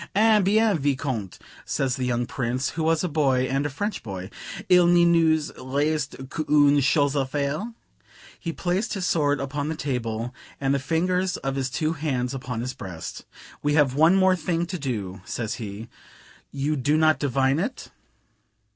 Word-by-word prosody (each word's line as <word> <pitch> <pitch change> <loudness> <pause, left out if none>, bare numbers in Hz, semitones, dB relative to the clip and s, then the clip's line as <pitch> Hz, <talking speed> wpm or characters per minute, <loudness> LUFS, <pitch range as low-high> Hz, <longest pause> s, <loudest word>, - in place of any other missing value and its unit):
"Eh 215 +1 +5
bien, 210 +2 +3
Vicomte!" 130 -8 -2 0.3
says 135 -1 -1
the 130 -3 -2
young 120 0 0
Prince, 125 +1 -2
who 165 - -4
was 160 +1 +2
a - - +1
boy, 140 -5 +2
and 135 +3 0
a - - -5
French 205 +9 -3
boy, 95 -3 -7 0.4
"il 180 -1 +6
ne 175 0 +5
nous 160 -2 +3
reste 140 0 -1
qu'une 145 -1 +3
chose 145 +1 +3
a 140 -2 +1
faire:" 145 - -3 0.6
he 165 - -3
placed 185 +7 -1
his 190 -2 -2
sword 145 -5 +2
upon 140 +1 -3
the 160 - -2
table, 120 -4 -3 0.3
and 135 0 +1
the 140 - +1
fingers 180 +6 0
of 135 - 0
his 135 -1 -2
two 155 +4 -1
hands 135 -5 -2
upon 125 -3 -4
his 130 +2 -3
breast: 90 -5 -8 0.4
"We 145 0 +1
have 145 -4 +4
one 160 +6 +5
more 190 -1 +4
thing 170 -1 -1
to 180 0 -5
do," 100 -9 -4
says 115 +2 -3
he; 105 +1 -6 0.6
"you 140 +2 -1
do 145 +3 +1
not 155 0 +4
divine 135 +1 +1
it?" - - -4
145 Hz, 175 wpm, -25 LUFS, 130-165 Hz, 0.6 s, il